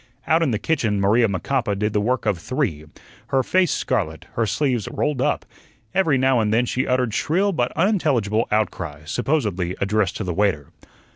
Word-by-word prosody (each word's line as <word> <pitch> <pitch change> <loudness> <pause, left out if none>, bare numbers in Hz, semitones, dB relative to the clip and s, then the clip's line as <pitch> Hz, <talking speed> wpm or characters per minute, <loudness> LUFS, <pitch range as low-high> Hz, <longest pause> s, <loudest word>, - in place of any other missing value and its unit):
Out 160 +1 +3
in 165 - +2
the 110 - 0
kitchen 110 -6 0
Maria 110 +4 +3
Macapa 105 +2 -1
did 105 +1 -1
the 105 - +2
work 125 +2 0
of 95 - 0
three, 105 - -2 0.4
her 135 +1 +1
face 185 +4 +2
scarlet, 90 - -2
her 115 -1 0
sleeves 120 0 0
rolled 150 -4 -1
up; - - 0 0.5
every 165 -7 +3
now 130 -1 +3
and 105 -1 +1
then 120 +3 +3
she 130 +2 -1
uttered 125 -3 +1
shrill 185 - +1
but 125 -9 0
unintelligible 140 - +1
outcries, 80 -8 -2
supposedly 105 - -1
addressed 100 -1 0
to - - -3
the 90 -2 -2
waiter. 95 -7 0
115 Hz, 180 wpm, -22 LUFS, 100-135 Hz, 0.5 s, Out